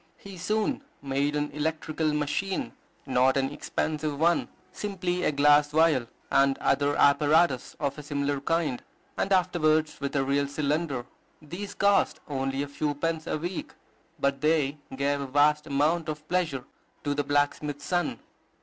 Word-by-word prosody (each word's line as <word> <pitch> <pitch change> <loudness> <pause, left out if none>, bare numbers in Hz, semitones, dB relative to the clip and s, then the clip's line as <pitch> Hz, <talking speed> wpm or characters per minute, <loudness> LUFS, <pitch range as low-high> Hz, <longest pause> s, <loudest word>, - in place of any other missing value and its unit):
He 200 -1 -11
soon 215 +9 -1 0.2
made 140 +2 0
an 145 0 -1
electrical 155 +1 -1
machine, 150 +6 -2 0.3
not 130 0 +3
an 135 0 0
expensive 150 0 -2
one, 170 +2 +3 0.2
simply 180 -3 -2
a - - +2
glass 145 +1 +5
vial, 155 -5 +3 0.2
and 135 0 +4
other 145 0 +1
apparatus 145 -1 +3
of 140 0 -2
a - - -5
similar 145 -1 -1
kind; 155 -4 0 0.3
and 195 - -1
afterwards 160 -4 +2
with 140 +1 -3
a 135 - +2
real 140 +1 +1
cylinder. 145 -2 -1 0.3
These 175 +7 -7
cost 200 0 +3
only 135 -1 -2
a - - -5
few 145 +1 -2
pence 160 +1 -2
a - - -1
week, 175 +4 -5 0.5
but 140 0 0
they 150 -2 +1 0.2
gave 140 +1 0
a 140 - -4
vast 150 +3 +3
amount 155 +3 +1
of 150 0 -6
pleasure 165 -8 -1 0.4
to 145 - 0
the 145 0 0
blacksmith's 145 0 0
son. 175 -2 0
150 Hz, 150 wpm, -27 LUFS, 140-165 Hz, 0.5 s, glass